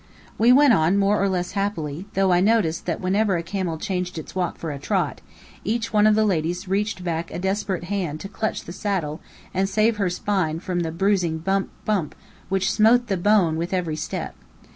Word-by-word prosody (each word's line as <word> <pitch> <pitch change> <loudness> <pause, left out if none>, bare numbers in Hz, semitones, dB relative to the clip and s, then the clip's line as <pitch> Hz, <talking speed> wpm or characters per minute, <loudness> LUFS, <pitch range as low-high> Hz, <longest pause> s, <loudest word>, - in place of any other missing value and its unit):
We 230 +3 +6
went 275 0 +6
on 165 +1 +3
more 200 +1 +2
or 200 - +2
less 180 -1 -1
happily, 195 -4 -3
though 195 -1 +3
I 175 - +4
noticed 195 -5 +2
that 170 - -1
whenever 195 +1 +1
a 170 - -3
camel 175 -2 -3
changed 180 -1 -3
its 160 - -7
walk 180 -2 -2
for 165 - -4
a 140 - -6
trot, - - -1 0.4
each 225 +1 -2
one 210 0 +5
of 215 - +5
the 215 0 +3
ladies 180 0 -1
reached 195 0 -1
back 165 -1 -2
a - - -6
desperate 190 0 -1
hand 175 -5 -3
to - - -5
clutch 215 +2 -3
the 170 - -8
saddle 180 -7 -2 0.3
and 190 +1 +1
save 215 +2 +2
her 195 -3 +1
spine 180 -4 -1
from 180 0 -2
the 165 -2 -2
bruising 180 -2 +1
bump! 195 +4 -1 0.2
bump! 195 -8 -1 0.3
which 195 0 +1
smote 235 +2 +4
the 195 - +2
bone 180 -4 +3
with 170 +3 -2
every 170 -4 -1
step. 155 - -4
190 Hz, 205 wpm, -23 LUFS, 170-205 Hz, 0.4 s, We